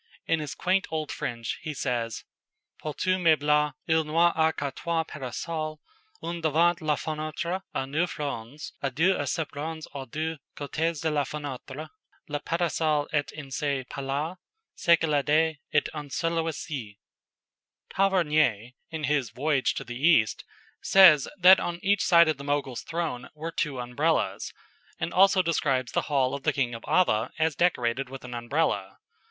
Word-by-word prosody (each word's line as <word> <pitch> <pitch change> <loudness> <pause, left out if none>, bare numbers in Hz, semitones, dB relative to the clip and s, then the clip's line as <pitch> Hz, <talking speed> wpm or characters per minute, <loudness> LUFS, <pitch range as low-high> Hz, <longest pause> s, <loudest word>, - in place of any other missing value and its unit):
In 165 - +1
his 150 -3 -5
quaint 190 +1 +1
old 155 -2 -3
French, 115 -1 -4
he 155 -1 -5
says: 120 -4 -2 0.6
"Pour 150 -1 -5
tout 185 0 +1
meuble 150 -3 +3
il 160 -1 +3
n'y 165 +3 +3
a 160 0 +3
que 140 -3 -3
trois 165 +3 -1
para 135 -5 -7
sol, 155 +3 -4 0.4
un 170 0 -4
devant 165 +3 +3
la 155 -1 +1
fenêtre, 155 +4 -3
a 135 - 0
neuf 155 +6 -1
ronds, 140 -1 -5
& 135 -2 -1
deux 175 +6 +4
à 145 - -2
sept 160 +2 -2
ronds 155 +2 -5
aux 135 -2 -6
deux 155 +4 -3 0.2
côtéz 160 +2 -2
de 160 - +1
la 145 -1 +1
fenêtre. 145 +1 -6 0.4
Le 145 -1 -3
para 170 +2 -1
sol 155 -2 +1
est 145 -2 0
en 140 -3 -8
ce 140 -1 -1
Pais 140 - -6
la, 145 +6 -2 0.4
ce 170 -1 +4
que 165 - -1
le 145 -2 +2
Dais 155 +1 +2
est 150 - +2
en 150 -2 -6
celui 165 +2 -1
ci." 125 -10 -6 1.0
Tavernier, 155 - +2 0.2
in 160 -2 -5
his 140 -4 +1
"Voyage 140 0 0
to - - -4
the 120 +1 -7
East," 155 -11 +4 0.4
says 170 -8 +7
that 185 +1 +8
on 175 0 -3
each 200 +1 +3
side 170 -1 +6
of 155 -3 +1
the 140 - -8
Mogul's 140 -3 -1
throne 160 -7 -4
were 160 +2 -5
two 145 -5 -2
Umbrellas, 135 +7 0 0.5
and - - -3
also 190 0 +5
describes 135 -7 0
the - - -1
hall 135 -3 +2
of 140 - -4
the - - +1
King 125 -4 0
of 115 - -7
Ava 115 -11 +2
as 160 -2 +1
decorated 130 -6 +1
with 135 0 -9
an 125 - -8
Umbrella. 120 -5 -1
150 Hz, 175 wpm, -27 LUFS, 135-165 Hz, 1.0 s, that